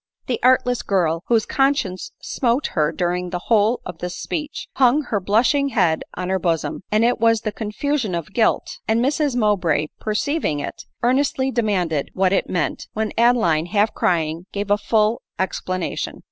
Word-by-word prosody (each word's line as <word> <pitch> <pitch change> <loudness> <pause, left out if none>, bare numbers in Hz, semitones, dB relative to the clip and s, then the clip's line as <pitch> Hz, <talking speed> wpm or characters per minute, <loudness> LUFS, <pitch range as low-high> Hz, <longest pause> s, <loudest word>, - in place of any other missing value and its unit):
The 250 - -2
artless 250 -1 +3
girl, 170 -4 0
whose 230 -2 +3
conscience 270 -10 0
smote 245 +2 0
her 150 -3 +2
during 180 0 -1
the 180 - -2 0.2
whole 220 +3 +3
of 180 -2 -7
this 180 0 -4
speech, 300 -1 -4
hung 265 +3 +4
her 220 -5 -1
blushing 240 +9 +2
bead 170 -7 +2
on 180 0 -4
her 190 0 +1
bosom; 165 -2 -1
it 230 +3 +2
was 225 -1 +3
the 215 - -2
confusion 220 +1 -2
of 170 +2 -5
guilt; 225 0 +1
and 220 +1 +2
Mrs 280 +1 +1
Mow 210 -4 +3
bray 155 -4 0
perceiving 215 - -1
it, 145 - -6 0.2
earnestly 265 +1 +1
demanded 185 - 0
what 190 0 +2
it - - 0
meant, 170 -5 -2
when 220 0 -2
Adeline, 220 -10 +3
half 205 +3 +1
crying, 165 0 0
gave 205 0 -3
a 205 - +5
full 215 +1 +1 0.2
explanation. 185 -1 -3
210 Hz, 165 wpm, -21 LUFS, 180-245 Hz, 0.2 s, a